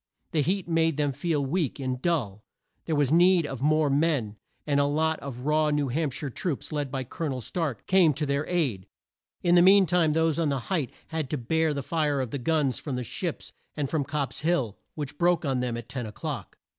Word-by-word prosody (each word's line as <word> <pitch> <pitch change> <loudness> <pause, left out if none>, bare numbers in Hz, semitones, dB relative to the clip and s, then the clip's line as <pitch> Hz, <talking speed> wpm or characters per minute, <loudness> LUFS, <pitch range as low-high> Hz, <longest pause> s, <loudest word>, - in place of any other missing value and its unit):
The 160 -4 +2
heat 185 +5 0
made 165 -2 +2
them 145 -2 +1
feel 145 +1 -1
weak 150 -1 -1
and 130 -2 -3
dull. 120 - -1 0.4
There 160 - 0
was 145 -2 +2
need 175 0 +5
of 135 -4 -6
more 155 +1 +3
men, 140 -7 +1 0.3
and 145 -1 +2
a 140 - +4
lot 160 +2 +1
of 130 -2 -7
raw 155 0 +3
New 145 -2 0
Hamp 150 +3 0
shire 140 +2 -5
troops, 160 +3 -4
led 145 -2 -2
by 135 -1 -2
Col 160 +6 -4
o - - -2
nel 130 -2 -3
Stark 145 - -3
came 185 -4 +5
to 150 +2 -1
their 140 +1 0
aid. 130 - -1 0.6
In 175 - +4
the 175 - +7
mean 195 +2 +7
time 170 -3 +2
those 160 0 +2
on 160 -3 +2
the 140 -1 0
height 150 -9 0 0.2
had 160 -4 -3
to 150 - -1
bear 160 +6 +1
the 140 -2 -3
fire 150 0 0
of 130 -4 -3
the 140 - -3
guns 145 -2 +1
from 140 -4 -4
the 125 - -2
ships - - -4 0.3
and 145 -3 -2
from 155 -3 +1
Copp's 140 -1 -3
Hill, 140 - 0 0.2
which 145 -1 -6
broke 175 -1 +3
on 135 -2 0
them 125 -2 -2
at 120 -1 -7
ten 125 -4 -5
o'clock. 105 - -6
150 Hz, 225 wpm, -27 LUFS, 135-165 Hz, 0.6 s, the